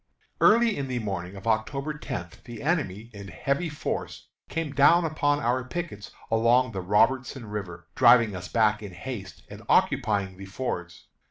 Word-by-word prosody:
Early 230 0 +5
in 140 -1 -3
the 130 -1 -2
morning 95 -4 -4
of 95 - -10
October 135 +7 -1
tenth 85 - -7
the 120 -3 -8
enemy, 120 - -1
in 100 -1 -9
heavy 140 - -2
force, 150 - -5 0.2
came 165 -3 -3
down 165 +5 +5
upon 145 -2 +1
our 125 0 0
pickets 130 - -6 0.2
along 115 +2 +3
the 95 -3 -4
Robertson 125 +6 +1
River, 95 -5 -6
driving 115 -4 +5
us 90 0 -6
back 105 +1 +2
in 100 -3 -8
haste 100 0 -7
and - - -10
occupying 100 -3 +2
the 95 - -9
fords. 95 -5 -5
115 Hz, 160 wpm, -26 LUFS, 100-140 Hz, 0.2 s, Early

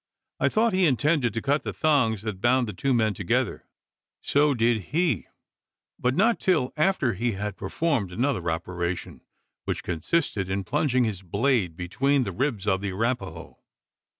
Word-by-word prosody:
I - - +3
thought 225 0 +2
he 185 -2 +4
intended 145 -2 +2
to 115 - -2
cut 145 +2 +1
the - - -5
thongs 125 -10 +2
that 105 -4 -5
bound 125 +1 +3
the 105 - -5
two 135 +9 -1
men 110 -4 +2
together. - - -1 0.5
So 145 0 +2
did 115 -4 +1
he: 170 -2 +1 0.7
but 125 +1 +1
not 225 +6 +3
till 160 -10 +1
after 155 -6 +2
he 115 +4 -1
had 100 +1 -4
performed 140 - -1
another 115 -4 -1
operation 85 +1 -4 0.4
which - - -3
consisted 95 - -1
in 95 +1 -1
plunging 135 0 +1
his 105 -5 -2
blade 100 - 0
between 135 +10 +1
the 100 - -3
ribs 115 -2 -2
of 95 -2 +1
the 100 -1 -2
Arapaho! 95 -5 -3
120 Hz, 160 wpm, -26 LUFS, 95-145 Hz, 0.7 s, he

